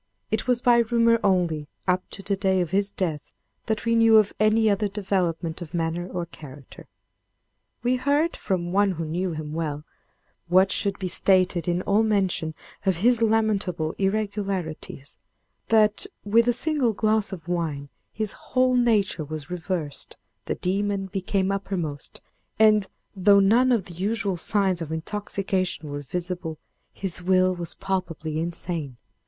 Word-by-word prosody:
It 220 - -1
was 250 -1 +2
by 240 -1 +5
rumor 230 0 +3
only, 175 -6 +1 0.2
up 185 0 0
to 195 - -8
the 200 - 0
day 190 -1 +1
of 175 -3 -1
his 200 +1 +1
death, 160 -6 -3 0.4
that 220 +1 -1
we 230 - +2
knew 225 -1 +6
of 210 -2 +3
any 215 +1 +4
other 205 0 +2
development 185 -5 -2
of 175 0 -7
manner 170 +1 -1
or 180 -2 -4
character. 145 -5 -13 1.0
We 250 +1 +2
heard, 285 +6 +1
from 175 -2 -2
one 200 0 +3
who 165 -1 -4
knew 175 +3 -2
him 155 -1 -6
well 150 -2 -3 0.6
(what 185 +2 +4
should 200 0 0
be 190 - -3
stated 185 -1 +2
in 175 +1 0
all 205 +2 +3
mention 190 -7 0 0.3
of 190 -2 +2
his 240 -1 +4
lamentable 210 -8 +1
irregularities), 195 -8 -3 0.5
that, 215 - +3 0.2
with 230 +3 +4
a - - +5
single 255 -2 +3
glass 215 0 +1
of 175 -3 -8
wine, 160 -5 -2 0.2
his 215 -1 -2
whole 255 0 +1
nature 220 -9 +2
was 155 +2 -7
reversed, 170 -4 -3 0.3
the - - -2
demon 195 +1 -1
became 195 0 0
uppermost, 180 -7 -4 0.4
and, 215 -2 +5 0.3
though 200 +1 +5
none 235 +6 +4
of 225 -7 +2
the 180 - -10
usual 195 +2 -1
signs 190 0 +1
of 160 -1 -5
intoxication 185 -1 -2
were 145 0 -4
visible, 175 +2 -4 0.3
his 185 -2 -4
will 185 0 +3
was 175 -2 -6
palpably 165 -5 -3
insane. 165 -5 -4
190 Hz, 150 wpm, -25 LUFS, 170-215 Hz, 1.0 s, knew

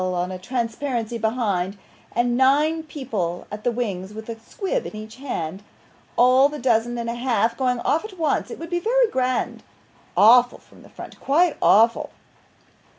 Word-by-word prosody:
on 180 0 -1
a 185 - -6
transparency 235 +1 -3
behind; 210 -4 -1 0.4
and 240 +1 +1
nine 290 +5 +3
people 225 - -4
at 210 +1 -7
the 245 - +1
wings 205 -4 -4
with 220 +1 -8
a 225 -1 -6
squib 405 - -3
in - - -9
each 215 +2 -9
hand 190 - -4 0.6
all 255 +3 +5
the 300 - -6
dozen 240 -2 +1
and 235 0 -4
a 235 - -2
half 235 -2 0
going 250 -2 0
off 315 - +1
at 420 -3 -9
once 320 -3 0
it 460 - -7
would 330 +1 -8
be 350 - +1
very - - +2
grand 255 0 -1 0.6
awful 245 +3 +6
from - - -20
the - - -16
front, - - -11
quite 320 +4 +2
awful. 230 +3 +4
240 Hz, 170 wpm, -23 LUFS, 220-280 Hz, 0.6 s, awful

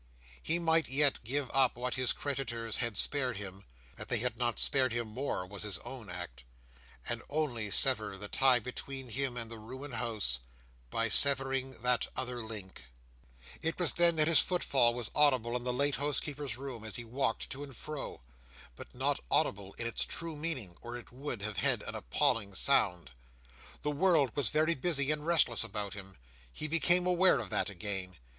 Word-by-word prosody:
He 165 - +1
might 165 -1 +2
yet 140 0 +2
give 130 +3 -2
up 135 -2 +4
what 125 +1 -3
his 130 -1 +1
creditors 120 -5 -3
had 115 -4 -2
spared 130 -4 0
him 100 -1 -8 0.3
(that - - -7
they 120 - +1
had 120 +1 -2
not 120 0 -1
spared 130 -3 +2
him 120 -1 -2
more, 110 -4 -3
was 100 +1 -6
his 105 -4 0
own 120 -4 -8
act), 90 -9 -7 0.6
and 120 0 -1
only 135 -8 -2
sever 105 -4 +3
the 105 +1 -5
tie 130 +3 +5
between 125 +2 -5
him 130 +1 -1
and 115 -1 -4
the 115 - -7
ruined 130 +5 -9
house, 110 - -1 0.5
by 115 - 0
severing 135 +1 +4
that 125 -1 +3
other 125 -2 -4
link— 100 - -8 0.8
It 165 +1 -2
was 175 - +2
then 170 -1 +4
that 155 -1 +3
his 165 - +7
footfall 130 -9 +2
was 120 -3 -3
audible 130 -5 +3
in 125 0 -3
the 125 - +1
late 140 +2 0
housekeeper's 145 -3 -2
room, 130 -4 -7
as 110 - -3
he 120 - -5
walked 115 -1 -2
to 140 +2 -5
and 135 -5 -7
fro; 150 - -5 0.5
but - - -12
not - - 0
audible 100 0 0
in 115 - -5
its 115 - +2
true 165 -1 -5
meaning, 140 - -4
or 120 +1 -6
it 120 - -13
would 125 -4 -5
have 110 -2 -3
had - - +2
an - - -6
appalling 100 - +1
sound. 90 - +2 0.7
The 150 - 0
world 150 -5 +2
was 145 -5 +1
very 155 +2 +2
busy 140 -1 +1
and 150 -1 -2
restless 155 -9 +3
about 105 -2 -5
him. 95 -4 -10 0.3
He 155 - -5
became 175 +3 +4
aware 180 +1 +4
of 110 -5 -6
that - - 0
again. 95 -2 -4
125 Hz, 185 wpm, -32 LUFS, 110-145 Hz, 0.8 s, his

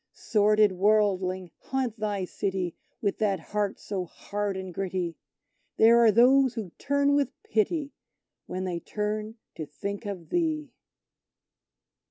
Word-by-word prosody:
Sordid 210 -1 +3
worldling, 190 -2 +1
haunt 255 -4 -3
thy 205 -3 -1
city 185 -2 -2 0.3
with 200 - 0
that 200 -4 +1
heart 205 +3 -2
so 195 -3 -3
hard 200 +3 -4
and 190 -1 -6
gritty! 180 -2 -2 0.6
There 230 +1 +7
are 230 -2 +6
those 255 +3 +5
who 210 -7 -5
turn 285 +1 +2
with 285 -1 +2
pity 285 +7 0 0.5
when 185 - -4
they 180 -2 -2
turn 215 +3 -3 0.2
to 155 - -6
think 200 +8 -5
of 185 -5 -6
thee! 315 -4 0
205 Hz, 130 wpm, -27 LUFS, 190-230 Hz, 0.6 s, There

